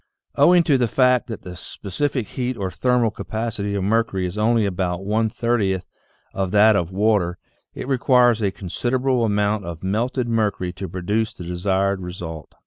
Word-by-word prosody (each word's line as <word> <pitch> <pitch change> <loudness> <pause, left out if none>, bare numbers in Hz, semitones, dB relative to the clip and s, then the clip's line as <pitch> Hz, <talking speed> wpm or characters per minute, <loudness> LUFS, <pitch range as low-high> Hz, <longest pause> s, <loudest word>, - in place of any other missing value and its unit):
Owing 175 0 +5
to 145 -5 +2
the 120 - +2
fact 125 +1 +3
that 115 -3 -7
the 90 -1 -8
specific 110 +7 -3
heat 125 -1 -3
or 95 -3 -3
thermal 125 -1 +1
ca - - -7
pacity 110 -2 -3
of 95 - -2
mercury 105 -2 +1
is 90 +1 -4
only 110 +1 +2
about 90 -1 -2
one 110 +2 +1
thirtieth 105 -6 0 0.5
of 95 -1 -1
that 105 +2 +5
of 85 -3 -1
water, 100 -3 +1 0.4
it - - -6
requires 125 -3 +3
a 100 - +2
considerable 125 +7 -1
amount 105 -1 +1
of 85 0 -7
melted 120 +6 -1
mercury 105 -6 0
to 95 0 -6
produce 105 +5 -2
the 90 - -8
desired 95 +2 0
result. 85 -4 -7
105 Hz, 170 wpm, -22 LUFS, 95-120 Hz, 0.5 s, Owing